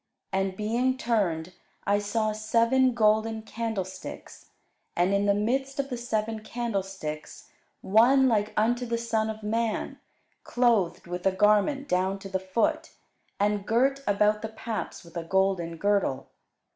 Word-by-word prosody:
And 190 -1 -1
being 240 +5 0
turned, 185 -9 0 0.3
I 205 +1 +2
saw 215 +1 0
seven 230 +4 +2
golden 220 0 +2
candlesticks; 220 -5 -6 0.5
and 180 +3 +2
in 200 +1 +2
the 200 - +4
midst 265 +6 -1
of 275 -1 -2
the 245 - -2
seven 225 -2 -2
candlesticks 195 -9 -5 0.3
one 245 +7 +5
like 210 -3 +1
unto 240 +3 +1
the 235 0 -1
Son 225 -2 -1
of 220 0 -6
man, 225 +1 -2 0.4
clothed 230 -8 +1
with 180 +2 -3
a - - +4
garment 210 +9 +2
down 185 0 +1
to 195 0 -9
the 190 0 -1
foot, 190 +4 -1 0.5
and 205 0 0
girt 270 +4 +2
about 210 +1 +2
the 220 - -4
paps 220 0 -5
with 170 0 -16
a 170 - -3
golden 180 -2 0
girdle. 195 -9 0
215 Hz, 145 wpm, -27 LUFS, 195-230 Hz, 0.5 s, one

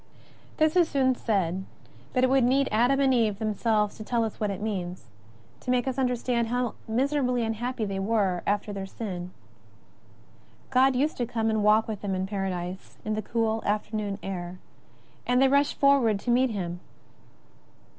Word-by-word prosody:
This 310 +1 +3
is 350 -3 +4
soon 265 -2 +2
said, 190 -6 -1 0.5
but 255 - +1
it 260 - +4
would 270 -1 +4
need 265 +3 +3
Adam 245 +5 +3
and 270 -1 +4
Eve 220 -5 +2
themselves 215 -1 0
to 215 - -7
tell 235 +1 0
us 220 - -4
what 210 - 0
it 195 -2 -4
means, 185 -4 -4 0.5
to 250 - -8
make 250 0 +2
us 265 0 -1
under 250 -1 +2
stand 235 -1 0
how 245 0 -1
miserably 250 +1 +1
imhappy 225 +1 -2
they 195 -1 -3
were 195 -3 +1
after 205 0 0
their 195 -1 -5
sin. 185 -4 -6 1.4
God 260 +1 +4
used 290 +5 0
to 240 - -1
come 225 -2 0
and 215 -1 0
walk 215 +1 +4
with 215 -3 -5
them 195 -2 -2
in 185 0 -1
Para 195 -1 -2
dise 180 +1 -6
in 215 - -1
the 215 - -1
cool 225 +1 -1
afternoon 210 -1 -2
air, 180 -2 -5 0.7
and 250 0 +3
they 270 - +6
rushed 280 +1 +2
forward 270 -7 +4
to 245 - -1
meet 255 +2 +3
Him. 175 -5 -4
225 Hz, 180 wpm, -27 LUFS, 200-250 Hz, 1.4 s, they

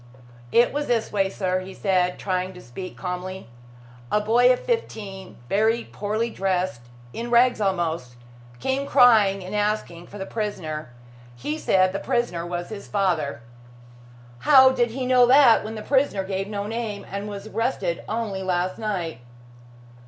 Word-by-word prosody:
"It 240 +2 +4
was 290 0 -2
this 235 -2 0
way, 195 -2 +1
sir," 185 -1 -1
he 185 +1 -9
said, 180 -3 +1
trying 185 -1 -2
to 180 - -12
speak 180 +10 -8
calmly. 185 -1 -5 0.6
"A 210 - +3
boy 235 +4 +4
of 250 - +1
fifteen, 205 - -4
very 220 - +2
poorly 215 +3 -3
dressed 185 - -1 0.3
in 235 +1 -5
rags 240 -1 +4
almost 165 -10 -1 0.4
came 270 - -1
crying 220 -8 +5
and 185 - -7
asking 205 -5 -2
for 205 - -10
the 190 - -5
prisoner. 175 - -4 0.5
He 145 +6 -4
said 185 0 +3
the 195 - -2
prisoner 175 -8 -1
was 175 0 -4
his 210 -2 -8
father." 175 -10 0 1.0
"How 265 - +7
did 240 -2 +1
he 255 +3 -4
know 250 -1 +5
that, 260 -3 +6
when 220 +1 -6
the 215 - -6
prisoner 265 -8 +1
gave 190 0 -3
no 200 -1 -4
name 215 -2 -4
and 200 +2 -4
was 200 0 -7
arrested 215 -6 -2
only 215 -3 -2
last 185 0 -1
night?" 180 - -3
200 Hz, 155 wpm, -24 LUFS, 185-230 Hz, 1.0 s, How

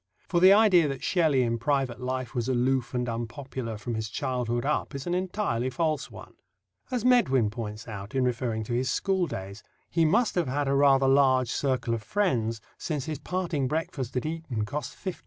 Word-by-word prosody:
For 175 - +1
the 185 +2 +8
idea 200 -6 +6
that 135 -2 -5
Shelley 155 -8 +3
in 115 -1 -1
private 135 -1 0
life 130 -1 -3
was 120 -1 -1
aloof 130 0 +1
and 125 0 -1
unpopular 120 0 -5
from 115 +3 -5
his 110 -1 -3
childhood 120 0 -2
up 150 0 -1
is 135 - -5
an 175 - -1
entirely 180 - -1
false 155 +3 -1
one. - - -12 0.6
As 250 -2 -2
Medwin 135 - +4
points 105 -1 -6
out, 105 +1 -7
in 130 - +2
referring 120 -3 -1
to 115 - -4
his 130 +2 0
school 190 +5 +1
days, 100 -1 -7 0.3
he 165 - +2
"must 215 +9 +3
have 175 -5 0
had 140 +2 -1
a 135 - +2
rather 135 -1 +4
large 130 -2 +4
circle 130 -4 0
of 115 - -2
friends, 115 - 0 0.2
since 150 -5 -3
his 155 -3 -4
parting 175 -7 -2
breakfast 135 -4 -3
at 125 - -2
Eton 155 -9 -3
cost 145 +7 -5
£50." 185 -3 -5
130 Hz, 195 wpm, -27 LUFS, 120-160 Hz, 0.6 s, the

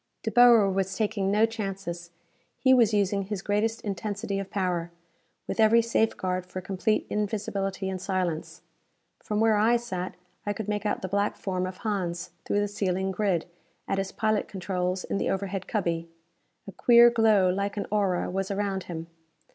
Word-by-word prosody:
De - - -1
Boer 240 -4 +7
was 190 0 -1
taking 210 -3 0
no 210 +2 +4
chances. 195 -6 -5 0.5
He 260 -1 +4
was 235 -4 +5
using 200 -1 +1
his 195 -1 -4
greatest 215 +2 0
intensity 200 0 -3
of 195 -1 -5
power, 180 -4 -1 0.6
with - - -4
every 225 +1 +6
safeguard 185 -5 0
for 185 - -6
complete 195 +4 0
invisibility 200 -2 -2
and 190 -1 -4
silence. 185 -4 -3 0.6
From 210 0 -2
where 220 -1 +4
I 225 +3 +4
sat 190 -7 -3 0.3
I 205 - -1
could 215 0 -5
make 210 0 -1
out 205 - -2
the - - -1
black 200 +2 0
form 185 -2 -2
of 185 0 -7
Hans 180 -6 -3
through 205 - +1
the 205 - 0
ceiling 190 -2 -1
grid, 190 -4 0 0.4
at 195 - 0
his 195 0 -3
pilot 215 -1 0
controls 185 -1 -2
in 200 - -2
the - - 0
overhead 195 -1 -3
cubby. 170 -5 -1 0.6
A - - -6
queer 235 +4 +6
glow 215 -5 +4
like 200 +2 -2
an 200 - -1
aura 195 -4 +1
was 195 +1 -2
around 200 -1 -2
him. 165 -2 -6
200 Hz, 170 wpm, -27 LUFS, 185-215 Hz, 0.6 s, Boer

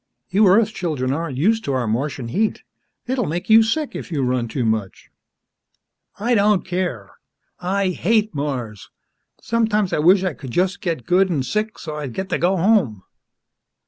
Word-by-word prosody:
"You 200 +2 +4
Earth 215 +3 +4
children 145 -10 -2
aren't 155 -3 -3
used 220 +9 +2
to 140 - -1
our 130 -2 0
Martian 120 +2 -2
heat. 215 - -1 0.4
It'll 250 -3 -1
make 175 +7 -3
you 225 +1 +9
sick 275 +7 -1
if - - -7
you 145 -4 -1
run 125 -1 0
too 120 +2 -2
much." 110 -3 -3 1.1
"I 235 +4 0
don't 205 -3 +3
care! 175 - -4 0.4
I 190 +2 0
hate 215 +4 +1
Mars! 130 -8 -4 0.5
Sometimes 220 -4 +1
I - - +1
wish 180 +5 +5
I 185 -4 -1
could 130 0 -9
just 185 +8 0
get 165 - -3
good 190 +2 +3
an' 150 -7 0
sick, 215 +9 -2
so's 150 -2 -6
I'd 135 -5 -5
get 190 0 -4
to - - -1
go 185 +3 +2
home!" 170 - +2
180 Hz, 175 wpm, -21 LUFS, 135-210 Hz, 1.1 s, you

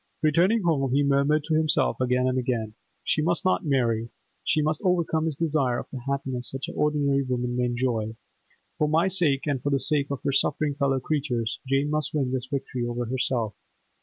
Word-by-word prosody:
Returning 180 +8 +3
home, 140 -6 +1
he 145 - +3
murmured 140 +2 +2
to 160 - -2
himself 155 -3 +2
again 125 0 +2
and 130 0 +1
again, 115 -4 -2 0.3
'She 155 - +1
must 170 +4 0
not 185 - +2
marry. 120 -4 +1 0.3
She - - +1
must 155 0 0
overcome 170 -3 +1
this 160 -3 -1
desire 145 -6 +1
of - - -5
a 130 - -4
happiness 130 -3 0
such 135 0 -4
as - - -6
ordinary 145 -2 +1
women 125 -2 -2
may 125 0 +1
enjoy. 120 -3 -1 0.6
For 150 - +2
my 165 +4 +3
sake, 165 -8 +2
and 140 -4 -1
for 145 - -1
the 140 -1 +2
sake 145 0 +1
of 140 0 -4
her 140 - +1
suffering 145 +2 +1
fellow 140 -2 +1
creatures, 130 -6 -2
Jane 135 +2 +1
must 155 -1 -1
win 135 -4 0
this 130 -1 -2
victory 135 -3 -3
over 120 0 -2
herself. 120 -3 -1
140 Hz, 195 wpm, -26 LUFS, 125-155 Hz, 0.6 s, Returning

